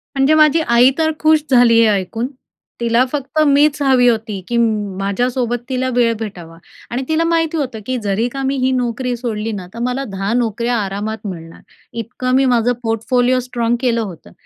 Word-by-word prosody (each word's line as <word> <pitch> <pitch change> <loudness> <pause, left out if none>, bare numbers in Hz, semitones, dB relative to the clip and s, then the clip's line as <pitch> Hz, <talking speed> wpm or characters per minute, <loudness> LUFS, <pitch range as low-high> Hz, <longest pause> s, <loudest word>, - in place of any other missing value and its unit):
म्हणजे 270 +3 +3
माझी 310 +1 +5
आई 240 +3 +5
तर 315 -1 +2
खुश 310 0 +4
झाली 240 -2 +5
हे 230 - +5
ऐकून. 205 +4 -1 0.5
तिला 235 +1 +2
फक्त 295 +1 -3
मीच 290 +1 +3
हवी 260 -3 +4
होती, 220 -4 0
की 240 - -1
म 215 -4 0
माझ्यासोबत 240 +5 -1
तिला 255 0 -1
वेळ 235 -2 +3
भेटावा 175 -7 -8 0.3
आणि 255 +2 -2
तिला 315 +1 +2
माहिती 330 -1 0
होतं, 260 -7 -3
की 255 -1 -2
जरी 205 +4 0
का 270 +2 -6
मी 270 +1 0
ही 260 - +2
नोकरी 250 0 -1
सोडली 225 -2 -3
ना, 190 -4 -6
तर 230 - -8
मला 260 +2 -2
10 195 +2 -2
नोकऱ्या 235 0 0
आरामात 210 +2 -4
मिळणार, 165 -3 -9 0.3
इतकं 255 +2 -2
मी 270 - +3
माझं 245 -1 +2
पोर्टफोलिओ 245 +3 +1
स्ट्राँग 240 -2 -1
केलं 235 -2 +1
होतं. 185 -7 -8
240 Hz, 185 wpm, -17 LUFS, 220-260 Hz, 0.5 s, माझी